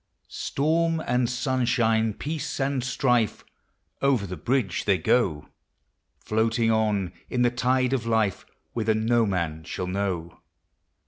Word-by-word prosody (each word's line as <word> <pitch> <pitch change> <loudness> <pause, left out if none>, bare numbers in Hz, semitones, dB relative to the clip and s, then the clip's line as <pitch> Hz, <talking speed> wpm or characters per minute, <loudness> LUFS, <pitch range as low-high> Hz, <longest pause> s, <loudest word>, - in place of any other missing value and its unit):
Storm 165 +3 0
and 125 -1 +1
sunshine, 120 -4 +1
peace 155 0 -4
and 135 -1 0
strife, 125 -3 +1 0.6
Over 135 -7 +2
the 90 -1 -5
bridge 105 - -1
they 100 -2 +3
go; 90 -10 +1 0.7
Floating 115 +1 +1
on 105 -4 +1 0.2
in 125 -1 +1
the 120 - +3
tide 125 +1 +1
of 120 -3 -1
life, 110 -4 +1 0.3
Whither 110 -2 +1
no 115 +1 +2
man 85 -5 -2
shall 90 - -4
know. 90 -3 -3
115 Hz, 125 wpm, -26 LUFS, 100-125 Hz, 0.7 s, they